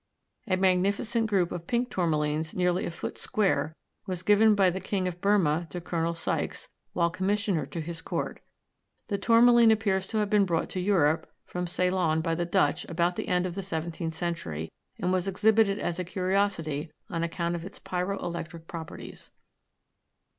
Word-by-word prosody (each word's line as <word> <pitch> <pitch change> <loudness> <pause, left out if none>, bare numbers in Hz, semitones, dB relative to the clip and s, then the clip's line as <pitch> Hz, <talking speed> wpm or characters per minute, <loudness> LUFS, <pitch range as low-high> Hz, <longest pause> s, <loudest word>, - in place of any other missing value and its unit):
A 185 -2 +2
magnificent 200 +5 +2
group 190 -5 +1
of 170 -1 -6
pink 245 +1 0
tourmalines, 155 -2 0
nearly 180 -1 +1
a - - -2
foot 170 - -6
square, 160 - 0 0.3
was 185 -1 -3
given 210 +2 +5
by 190 -2 +4
the 185 - -3
king 190 0 -1
of 175 -1 -5
Burmah 175 -5 +2
to 180 - -5
Col. 170 -1 -2
Sykes, 165 - -2 0.3
while 170 -1 +2
commissioner 190 -1 0
to 170 - -6
his 165 +1 -5
court. - - -3 0.7
The 200 -2 -1
tourmaline 235 +2 +6
appears 200 -4 +2
to 220 - -3
have 210 -1 +2
been 205 0 +4
brought 165 -2 -1
to 185 - -3
Europe 170 -5 +2
from 180 0 -4
Ceylon 180 -3 +1
by 165 0 0
the 175 +1 -1
Dutch 190 +2 +2
about 170 +1 0
the - - -4
end 180 0 +2
of 180 - -3
the 195 - -4
seventeenth 165 -2 -4
century, 85 - -3 0.3
and 180 +1 0
was 185 0 0
exhibited 205 +1 +3
as 175 -4 -2
a - - 0
curiosity 180 -4 -1 0.2
on 165 -2 -1
account 170 0 -1
of 170 -1 -4
its 195 - -9
pyro 185 +2 -2
electric 170 -1 -5
properties. 165 -2 -8
180 Hz, 175 wpm, -28 LUFS, 170-200 Hz, 0.7 s, tourmaline